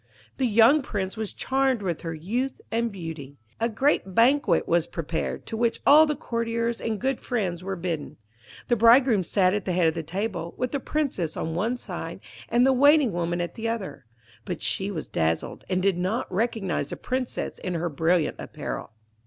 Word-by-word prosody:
The 260 - +2
young 230 +7 +6
Prince 195 -6 -3
was 220 -2 -4
charmed 265 -4 0
with 175 -4 -2
her 165 -1 -4
youth 235 +12 -2
and 230 0 0
beauty. 160 -7 -7 0.2
A 230 +1 +1
great 225 -5 +1
banquet 265 +5 +4
was 170 -1 +2
prepared, 165 0 -4
to - - -5
which 235 +1 0
all 310 +2 +8
the 300 - 0
courtiers 230 -1 -2
and 220 -2 -2
good 265 0 -1
friends 185 -8 -2
were 195 +1 -3
bidden. 170 -4 -4 0.5
The 240 - +3
bridegroom 230 -2 +5
sat 185 +1 +2
at 205 -2 -2
the 185 - -1
head 175 -2 +3
of 160 - +2
the 165 - -3
table, 185 +1 -4
with 250 0 -2
the 280 - -1
Princess 260 - -2
on 160 - -2
one 225 +9 0
side - - -6 0.3
and 240 +1 +4
the 265 - +5
Waiting 285 -1 +5
woman 175 0 -1
at 175 - -3
the 225 0 -3
other; 195 - -5 0.4
but 180 -4 -5
she 195 +1 -1
was 165 -6 -5
dazzled, 80 0 -1
and 185 -1 0
did 195 -3 +2
not 190 +7 -1
recognise 195 - -1
the - - -5
Princess 255 0 -3
in 180 -2 -3
her 170 +1 -1
brilliant 165 +1 +1
apparel. - - -6
205 Hz, 190 wpm, -26 LUFS, 175-240 Hz, 0.5 s, all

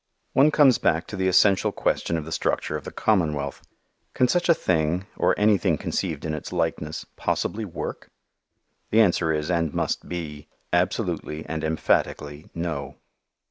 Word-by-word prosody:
One 140 +3 +6
comes 145 -4 +5
back 80 0 +1
to - - -5
the 95 -1 0
essential 95 +1 +4
question 85 - 0
of 80 - -5
the 80 - -8
structure - - -1
of - - -5
the - - -6
commonwealth. 75 -9 0 0.5
Can 125 - +4
such 175 +5 +1
a 170 - +7
thing, 85 - 0
or - - +2
anything 100 -6 +3
conceived 80 -3 -3
in 80 - -2
its 75 - -6
likeness, 80 -3 -2
possibly 110 +1 -1
work? 90 - -6 0.8
The 110 - +3
answer 90 -6 +3
is, 75 +2 -1
and 85 -3 0
must - - -2
be, 75 -4 -6 0.3
absolutely 90 -3 -1
and 80 -1 -4
emphatically 75 -1 -1
no. 75 -4 -4
85 Hz, 155 wpm, -25 LUFS, 75-95 Hz, 0.8 s, a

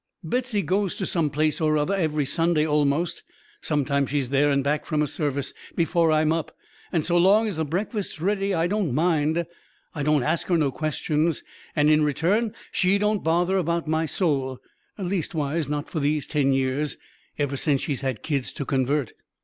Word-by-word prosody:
"Betsy 235 +3 -1
goes 190 +3 0
to 190 - -3
some 165 -5 0
place 155 +3 0
or 155 -1 +3
other 150 +6 0
every 155 -6 0
Sunday 165 +1 +2
almost; 150 +2 +1 0.4
sometimes 140 -2 0
she's 140 -3 -1
there 140 +2 +3
and 140 -1 +2
back 150 +2 0
from 150 -2 0
a - - +2
service 140 -2 -2 0.2
before 165 -1 +2
I'm 155 0 +3
up, 165 -1 -4 0.3
and 165 -4 0
so 175 0 +2
long 200 +5 +5
as 205 - -3
the 160 0 -1
breakfast's 195 - -3
ready 195 +3 0
I 165 -3 +1
don't 180 - 0
mind. 160 0 +1 0.5
I 150 - -4
don't 150 -2 +2
ask 160 +4 0
her 175 - +3
no 145 -4 +1
questions, 155 +2 -1 0.3
and 150 -1 +3
in 155 0 +4
return 175 - +1 0.2
she 185 +2 +2
don't 210 0 0
bother 175 +4 +2
about 170 -1 -1
my 160 +1 +1
soul 135 -6 0 0.4
leastways, 165 -6 -2
not 150 -1 -2
for 160 - -3
these 145 0 0
ten 145 -3 +1
years, 135 +2 0 0.4
ever 145 -1 -1
since 140 0 +1
she's 140 -4 -2
had 130 -5 -3
kids 140 -5 -1
to 140 - -4
convert. 135 -1 0
155 Hz, 180 wpm, -25 LUFS, 145-175 Hz, 0.5 s, long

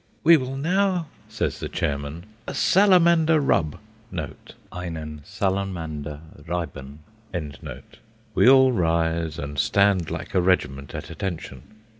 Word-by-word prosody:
"We 170 +1 +8
will 135 -2 -2
now," 180 +3 +1 0.2
says - - -2
the - - -4
chairman, 70 +4 -3 0.2
"a - - -4
Salamander 170 +1 +5
rub" 85 - +1 0.9
("Einen 80 -4 -6
Salamander 80 -7 -3 0.3
reiben"). 75 -4 -5 1.3
We - - +5
all 130 -1 +7
rise, 80 -4 0
and 70 -3 -5
stand 100 -4 +3
like - - -6
a 95 - +3
regiment 75 -7 0
at 80 +3 -6
attention. 80 -7 -5
90 Hz, 110 wpm, -24 LUFS, -, 1.3 s, We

